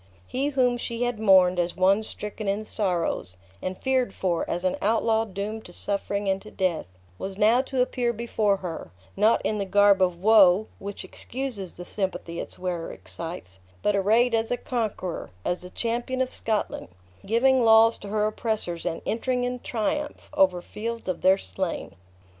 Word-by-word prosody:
He 270 +3 -1
whom 255 -4 +2
she 235 0 -3
had 245 -3 -1
mourned 185 -4 +5
as 175 0 0
one 195 +3 +4
stricken 210 0 -6
in 205 +2 -1
sorrows, 175 - -1 0.2
and 185 0 -4
feared 260 -5 0
for, 175 -3 -1
as 175 +1 -2
an 185 - +2
outlaw 225 +1 +2
doomed 210 +2 -5
to 175 - -12
suffering 200 +1 -2
and 195 0 +1
to 215 - -11
death, 185 - -1 0.3
was 190 0 -5
now 225 +4 +5
to 265 -1 0
appear 245 -1 -1
before 220 -3 0
her, 165 - -5 0.3
not 215 +3 +3
in 215 - -1
the 200 - -1
garb 200 0 +5
of 180 -2 +2
woe, 205 -1 +6
which 200 0 -6
excuses 240 -8 -5
the 175 - -9
sympathy 185 -3 -3
its - - -6
wearer 180 -2 -3
excites, 130 - -8 0.2
but 210 - +2
arrayed 225 +5 +3
as 225 0 +1
a 245 - 0
conqueror, 215 -9 -3 0.2
as 175 - -1
the 180 - -9
champion 240 +5 -2
of 260 0 0
Scotland, 220 -2 -2 0.4
giving 245 +5 +3
laws 225 0 +6
to 205 - -9
her 210 +1 0
oppressors, 215 -6 -2
and 165 -1 -3
entering 250 +2 0
in 250 0 -2
triumph, 290 +7 -3
over 180 -2 +3
fields 230 +1 -5
of 185 -2 -2
their 190 +1 +5
slain! 190 -2 -4
210 Hz, 175 wpm, -26 LUFS, 185-230 Hz, 0.4 s, woe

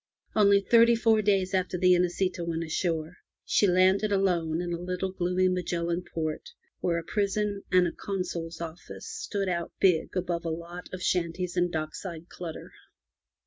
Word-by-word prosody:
Only 200 -2 +5
thirty 235 +3 +5
four 225 -1 +3
days 195 -2 +1
after 185 -1 0
the 180 0 +5
Inesita 180 0 +1
went 165 -1 -2
ashore, 165 0 -2 0.3
she 205 - +3
landed 190 +3 +3
alone 175 -5 +1
in 175 0 -2
a 170 - -4
little 180 +1 -2
gloomy 185 0 +1
Magellan 175 -1 -1
port, 155 -2 -3 0.3
where 170 -1 0
a 170 - -3
prison 205 +1 -1
and 185 -1 +5
a 170 - -1
Consul's 175 -4 -4
office 165 0 -8
stood 435 - -3
out 170 -2 -2
big 180 -1 +2
above 175 -1 -1
a 165 - -2
lot 170 +2 -6
of 185 0 -6
shanties 175 0 -1
and 175 -1 +1
dock 155 -1 -3
side 170 -3 -7
clutter. 170 -3 -8
180 Hz, 165 wpm, -28 LUFS, 170-195 Hz, 0.3 s, Only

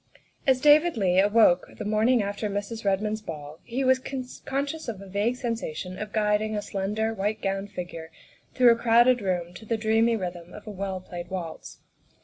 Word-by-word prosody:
As 260 -1 +4
David 300 +2 +5
Leigh 185 -3 +3
awoke 205 -3 +4
the - - -5
morning 215 +3 +3
after 205 +1 -3
Mrs. 205 +3 -4
Ked 195 -1 +1
mond's 215 0 -2
ball 155 -4 -8
he 250 +3 -3
was 260 0 +3 0.4
conscious 280 +3 -3
of 220 -5 -4
a 195 - -10
vague 205 +5 0
sensation 195 - -4
of 210 0 -5
guiding 215 0 +1
a 205 - -2
slender, 210 +3 -2
white 210 +1 -2
gowned 195 0 -2
figure 175 -4 -7 0.5
through 250 -2 +7
a - - +4
crowded 240 +1 +4
room 180 -3 -2
to 180 - -11
the 225 +1 -1
dreamy 225 +1 +2
rhythm 175 -3 -6
of 210 - -11
a 215 - -6
well 190 -1 -4
played 175 -1 -8
waltz. 180 -4 -7
210 Hz, 185 wpm, -26 LUFS, 190-230 Hz, 0.5 s, through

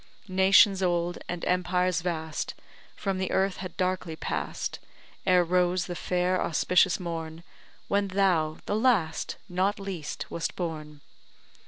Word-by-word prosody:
Nations 190 +1 +5
old, 175 -1 0
and 175 -1 -3
empires 180 -1 +1
vast, 160 -2 -3 0.4
From 195 -2 -2
the 190 - -1
earth 190 0 +1
had 185 -1 -7
darkly 185 -3 -1
pass'd - - -3 0.5
Ere 180 -1 +5
rose 180 +1 +1
the 180 - -5
fair 180 +1 0
auspicious 180 +2 +3
morn 165 -2 -5 0.4
When 200 0 +1
thou, 180 -5 +2
the 205 - -1
last, 210 -9 +1
not 190 +3 0
least, 185 -6 -5
wast 170 - -3
born. 155 -4 -5
180 Hz, 130 wpm, -28 LUFS, 170-190 Hz, 0.5 s, Nations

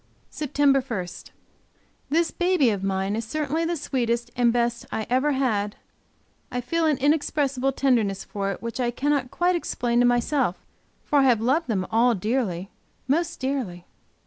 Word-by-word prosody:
SEPTEMBER 280 -2 +2
1. 225 -9 -4 1.0
This 330 +2 +2
baby 350 -9 +2
of 200 -2 -3
mine, 195 +1 -1
is 225 - -2
certainly 305 +6 -1
the 340 0 -1
sweetest 240 -4 -1
and 240 -1 +3
best 235 0 0
I 220 - -2
ever 275 +4 +2
had 215 -6 0 0.8
I 250 - -2
feel 320 +7 0
an 300 -3 +2
inexpressible 280 -2 +1
tenderness 230 -8 +1
for 195 -1 -3
it, 195 - -7
which 230 +2 -4
I 245 -1 +1
cannot 275 +1 0
quite 355 +5 +1
explain 240 -7 0
to 245 - +5
myself, 245 - +1 0.4
for 290 - +3
I 270 - +4
have 245 -4 +4
loved 270 +9 +1
them 195 -6 0
all 235 +2 +4
dearly, 200 -3 -2 0.4
most 335 +5 0
dearly. 255 -10 -3
250 Hz, 160 wpm, -25 LUFS, 225-290 Hz, 1.0 s, to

